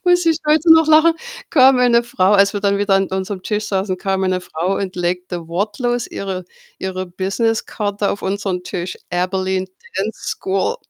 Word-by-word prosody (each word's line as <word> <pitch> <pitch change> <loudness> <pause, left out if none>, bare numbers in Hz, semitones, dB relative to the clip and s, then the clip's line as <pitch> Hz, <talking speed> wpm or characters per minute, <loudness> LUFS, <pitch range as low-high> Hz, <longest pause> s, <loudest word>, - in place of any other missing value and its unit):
muss 355 0 +4
ich 325 -1 +3
heute 315 +2 +6
noch 320 -1 +6
lachen, 315 +1 +5 0.4
kam 265 -2 +6
eine 240 -1 +4
Frau 190 -5 +1
als 200 0 +4
wir 205 - -2
dann 200 0 +1
wieder 205 -1 +2
an 195 0 +2
unserem 190 0 -4
Tisch 210 -1 -2
saßen, 190 -1 -1
kam 195 0 -1
eine 185 -1 0
Frau 180 +2 -2
und 185 -2 -4
legte 175 -1 -3
wortlos 220 +7 -1
ihre 190 -2 -5 0.3
ihre 185 0 -4
Business-Karte 205 +2 -1
auf 200 - -5
unseren 190 -2 -2
Tisch. 180 0 -4
„Abilene 185 +1 -1 0.3
Dance 210 +3 -3
School“ 195 - -1
195 Hz, 170 wpm, -19 LUFS, 185-225 Hz, 0.4 s, heute